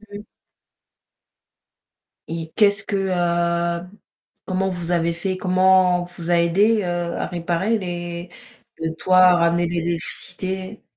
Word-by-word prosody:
Mmh 205 -1 -11
mh. 210 - -11 2.0
Et 165 -1 -5
qu'est-ce 205 -1 +3
que, 200 - -2
heu 170 -2 0 0.6
comment 190 0 -1
vous 175 -1 -3
avez 170 -1 +1
fait? 185 +2 -3
Comment 185 -1 +3
on - - -5
vous 175 -1 -7
a - - +4
aidé, 200 +6 +3
heu, - - -4
à 175 -1 -2
réparer 175 +5 -1
les 175 -2 -5 0.5
les 160 0 -3
toits 185 +2 +2
à 180 -1 +7
ramener 170 0 +2
de 170 - -4
l'électricité? 185 +3 -4
175 Hz, 135 wpm, -21 LUFS, 170-190 Hz, 2.0 s, à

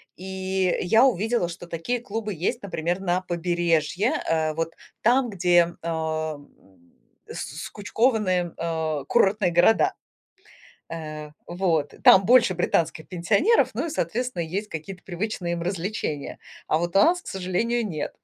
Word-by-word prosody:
И, 190 0 -2
э, - - -2
я 225 +8 +5
увидела, 225 -5 +1
что 175 +1 -8
такие 170 +9 -2
клубы 220 -2 -4
есть, 235 +10 -2
например, 175 -1 -2
на 180 -1 0
побережье, 175 0 0 0.2
э, 160 -1 +1
вот 165 +1 -3 0.3
там, 245 +2 +3
где, 175 -3 +3
ам, 160 -2 -3 0.8
скучкованы, 205 -5 -1
а, 160 -3 -2
курортные 200 -5 +2
города. 175 +6 +4 1.0
Э, 155 -2 -6 0.2
вот 170 -4 0
там 190 - +8
больше 235 -3 +5
британских 165 -2 0
пенсионеров, 200 - +2
ну - - -2
и, - - -4
соответственно, 245 - -2
есть 195 +6 -4
какие-то 180 +4 -7
привычные 180 -1 -3
им 170 - -3
развлечения, 175 -4 -3 0.3
а - - +2
вот 175 +2 -3
у 195 - +7
нас, 355 +2 +4
к - - -16
сожалению, 195 +6 -1
нет. 155 -5 -4
180 Hz, 135 wpm, -25 LUFS, 165-210 Hz, 1.0 s, там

